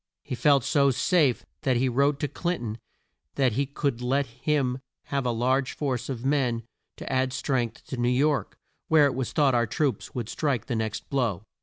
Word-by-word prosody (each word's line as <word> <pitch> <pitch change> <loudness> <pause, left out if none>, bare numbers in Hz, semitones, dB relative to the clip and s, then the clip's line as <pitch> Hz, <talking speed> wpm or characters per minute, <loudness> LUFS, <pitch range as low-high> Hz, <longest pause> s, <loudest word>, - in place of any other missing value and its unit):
He - - -6
felt 135 +2 +4
so 140 -1 +3
safe 140 0 +2 0.2
that 130 -5 +2
he 130 +2 +2
wrote 140 +3 +2
to 145 - +1
Clin 175 +5 -2
ton 110 -1 -5 0.6
that 130 -3 +3
he 135 +5 0
could 140 -3 -2
let 135 +3 +1
him 130 +1 -1 0.2
have 140 -2 -2
a - - +2
large 130 +3 +1
force 135 -4 -2
of 125 -2 -4
men 130 -5 +1 0.3
to - - -5
add 130 0 +1
strength 120 -6 -2
to 130 - -6
New 120 0 +1
York, 140 +4 +1 0.3
where 155 -2 +6
it 140 - +1
was 130 -2 -3
thought 145 -4 +3
our 120 -1 +2
troops 135 -1 -1
would 120 -4 -3
strike 140 0 -1
the 120 - -2
next 110 -1 -3
blow. 115 -9 0
130 Hz, 195 wpm, -26 LUFS, 120-140 Hz, 0.6 s, where